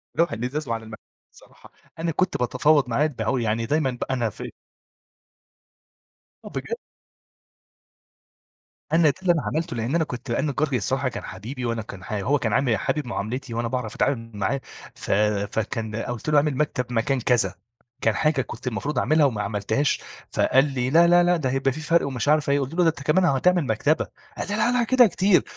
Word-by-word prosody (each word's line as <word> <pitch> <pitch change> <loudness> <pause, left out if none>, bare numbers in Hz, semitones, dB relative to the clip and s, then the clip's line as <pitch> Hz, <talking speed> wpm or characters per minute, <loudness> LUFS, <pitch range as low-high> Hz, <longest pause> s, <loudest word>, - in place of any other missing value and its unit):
لوح 170 +1 +2
الإزاز 125 +6 -3
وعلي 115 -1 -2
المكتب 110 -1 -10 0.3
الصراحة. - - -18 0.3
أنا 165 0 -1
كنت 185 +4 0
باتفاوض 130 +3 +2
معاه 140 +6 +2
الد 125 -8 -3 0.2
يعني 115 +1 0
دايمًا 145 0 +1
بقى 125 +2 -4
أنا 120 -3 0
في - - -8 1.9
آه - - -7
بجد! - - -4 2.2
أنا 160 -2 +5
ده - - +1
اللي 180 -2 +4
أنا 160 - -1
عملته. 165 +2 -2
لأن 115 +7 -1
أنا 170 - +3
كنت 125 -3 -7
أنا - - 0
النجار 145 0 0
الصراحة 130 +3 0
كان - - -7
حبيبي، 120 +7 -6
وأنا 115 -1 -1
كان 100 -3 -10
ح 110 - -6
هو 125 +8 +1
كان 115 -4 -1
عامل 120 -3 +2
حابب 150 +3 -2
معاملتي 120 +2 -4
وأنا 115 +1 -1
باعرف 125 -3 -3
أتعامل 115 -4 -1
معاه، 105 +7 -1 0.3
ف - - -5 0.4
فكان 110 0 -2
قلت 120 +5 -4
له: 150 - +4
"أعمل 145 -2 +2
مكتب 140 -4 0
مكان 125 +3 +1
كذا." 110 -7 +2 0.5
كان 110 -2 +2
حاجة 155 -1 +2
كنت 125 - -8
المفروض 135 +6 -2
أعملها 155 -1 +3
وما 115 -7 0
عملتهاش. 105 +7 0 0.3
فقال 135 +2 +3
لي: 125 -1 -1
"لا، 170 +4 +6
لا، 175 0 +6
لا، 175 0 +3
ده 135 -5 -1
هيبقى 135 +1 +1
في 155 - -6
فرق." 165 -1 +2
ومش 130 -3 -3
عارف 150 -1 +3
إيه 140 0 +3
قلت 135 +3 -3
له: 175 -1 +3
"أنت 155 -3 -1
كمان 170 +6 +3
هتعمل 175 +3 +3
مكتبة." 140 +7 +1 0.3
قال: - - -3
"لا، 215 +4 +1
لا، 245 -1 +2
كده 250 0 +5
كتير." 190 +1 +3
135 Hz, 190 wpm, -24 LUFS, 115-155 Hz, 2.2 s, لا